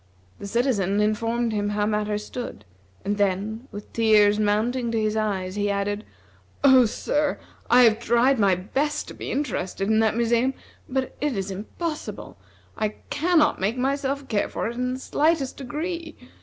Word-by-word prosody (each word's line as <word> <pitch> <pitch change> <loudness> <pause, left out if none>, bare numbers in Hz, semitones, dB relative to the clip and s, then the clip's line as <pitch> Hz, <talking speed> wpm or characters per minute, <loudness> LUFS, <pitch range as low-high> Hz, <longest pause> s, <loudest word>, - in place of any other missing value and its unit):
The - - -6
citizen 205 -4 +1
informed 225 +2 0
him 205 -1 0
how 205 0 0
matters 210 0 -1
stood, 240 - -7 0.4
and 205 +1 0
then, 205 +5 -1
with 205 0 -9
tears 215 -2 +4
mounting 230 +4 +1
to 225 - 0
his 215 0 0
eyes, 195 -4 -1
he 205 0 -1
added: 205 +1 -1 0.6
"Oh, 260 -3 +7
sir, 295 +6 -1 0.3
I 250 +1 +7
have 225 -2 +5
tried 240 +3 +3
my 195 -3 +4
best 270 +11 -2
to - - -8
be - - -7
interested 195 -8 -2
in 220 0 +4
that 220 -1 +2
museum; 235 +3 +2 0.3
but 260 0 -2
it 290 -6 0
is 195 0 -3
impossible; 300 - -5 0.4
I 215 -1 -2 0.2
cannot 315 - +2
make 210 +6 0
myself 275 +1 -1
care 205 -3 0
for - - -3
it 230 - -3
in 250 +1 -2
the - - -7
slightest 300 -1 +1
degree! 320 +5 -5
225 Hz, 165 wpm, -24 LUFS, 205-265 Hz, 0.6 s, Oh